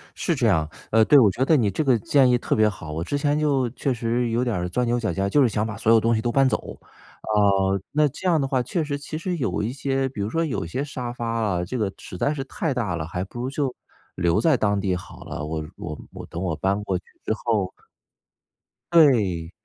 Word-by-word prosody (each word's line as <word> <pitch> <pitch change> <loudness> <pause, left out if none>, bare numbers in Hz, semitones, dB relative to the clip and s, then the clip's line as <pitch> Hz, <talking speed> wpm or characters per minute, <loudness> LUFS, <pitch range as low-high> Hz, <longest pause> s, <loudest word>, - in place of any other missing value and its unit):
是 - - 0
这 - - +2
样， 80 -1 +2 0.2
呃， 115 0 +5
对， 145 - +7
我 110 -5 +6
觉 125 - -1
得 160 - +4
你 110 -6 +2
这 155 - -1
个 130 -4 +4
建 135 +4 +4
议 125 - +4
特 - - -1
别 110 0 +4
好。 85 -7 -5
我 80 +2 -3
之 145 - -2
前 145 +1 +1
就 140 -5 +1
确 135 +2 -1
实 120 0 -1
有 115 +2 +1
点 120 -3 -1
儿 90 -1 -2
钻 125 +7 0
牛 120 +1 +1
角 110 -5 -1
尖 95 - -1
儿， - - 0
就 145 - +4
是 130 - +4
想 105 +1 -1
把 110 -1 -4
所 110 - +2
有 115 - +7
东 115 +1 +2
西 110 - 0
都 120 - -1
搬 135 +2 +4
走。 - - -3 0.4
啊， - - -6 0.6
那 150 0 +3
这 145 +7 -5
样 170 -3 +4
的 135 - 0
话 130 -1 +1
确 170 +4 -1
实 145 -1 -3
其 145 +2 -6
实 175 +2 -3
有 115 - -1
一 115 +4 -2
些 135 -1 -1
比 115 -6 -6
如 100 - -1
说 165 +6 0
有 145 - -2
一 - - -6
些 130 +12 -3
沙 125 -4 -5
发 120 -1 -5
啊， 105 -6 0
这 125 - -4
个 105 -4 -1
实 90 - -9
在 145 - +1
是 140 -3 -4
太 150 +2 -2
大 110 -9 -1
了， 80 -2 -3
还 90 +1 -3
不 100 +5 -9
如 125 - -2
就 135 -2 -2 0.4
留 85 -1 +2
在 160 -4 +4
当 105 -4 +1
地 95 -2 0
好 90 - -9
了。 - - -5
我 80 0 -4
我 75 - -6
我 - - -8
等 85 - -6
我 90 -4 -1
搬 100 +5 0
过 95 -3 -1
去 90 - -11 0.2
之 - - +1
后 110 -4 -1 1.2
对， 105 - +4
120 Hz, 280 characters per minute, -24 LUFS, 95-135 Hz, 1.2 s, 对